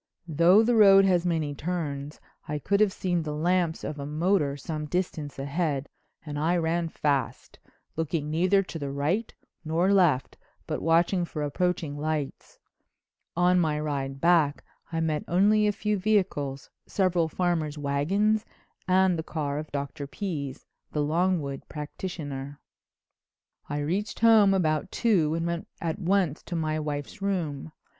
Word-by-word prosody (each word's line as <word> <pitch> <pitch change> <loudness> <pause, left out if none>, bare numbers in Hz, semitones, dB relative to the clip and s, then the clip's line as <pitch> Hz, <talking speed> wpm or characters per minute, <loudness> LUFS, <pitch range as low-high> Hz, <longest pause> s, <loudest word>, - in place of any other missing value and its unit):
Though 170 +7 +5
the 240 +1 +2
road 195 -2 +7
has 180 -2 +2
many 160 -4 0
turns 145 -3 -4 0.3
I 150 - -2
could 200 +7 0
have 210 -2 +4
seen 180 -2 -1
the 150 -1 -4
lamps 170 +1 0
of 150 - -5
a 140 - -4
motor 150 -2 +1
some 150 +1 -5
distance 160 -4 -3
ahead 145 0 -2 0.4
and 145 -1 -4
I 170 +4 +2
ran 165 0 0
fast, 140 -6 -2 0.4
looking 160 -1 -2
neither 185 +5 +3
to 170 -3 -7
the 140 -2 -4
right 150 +11 -1 0.3
nor 170 +5 +2
left 170 -9 +2 0.3
but - - -3
watching 170 +3 +3
for 155 -3 -4
approaching 155 -1 -1
lights. 150 -2 -4 0.8
On 180 +1 +4
my 155 -3 +1
ride 135 -3 -3
back 165 -3 +3 0.3
I 165 0 -1
met 155 -2 0
only 210 +4 +4
a - - +3
few 210 0 -1
vehicles, 180 -10 0 0.2
several 180 -4 +1
farmers' 160 -3 -1
wagons 185 +10 +1 0.4
and 185 -2 +3
the - - -2
car 145 -3 -3
of 155 - -8
Dr. 140 0 -4
Pease, 145 -6 -5 0.3
the 150 - +1
Longwood 160 -3 0
practitioner. 145 -3 -6 1.1
"I 145 - -2
reached 180 +11 -2
home 220 -4 +6
about 155 -2 0
two 175 -10 +2
and 165 0 -2
went 170 0 -3
at 165 +3 -3
once 185 -5 +1
to 175 - -5
my 155 -1 -1
wife's 145 +3 -5
room. 160 -7 -2
165 Hz, 150 wpm, -27 LUFS, 145-185 Hz, 1.1 s, road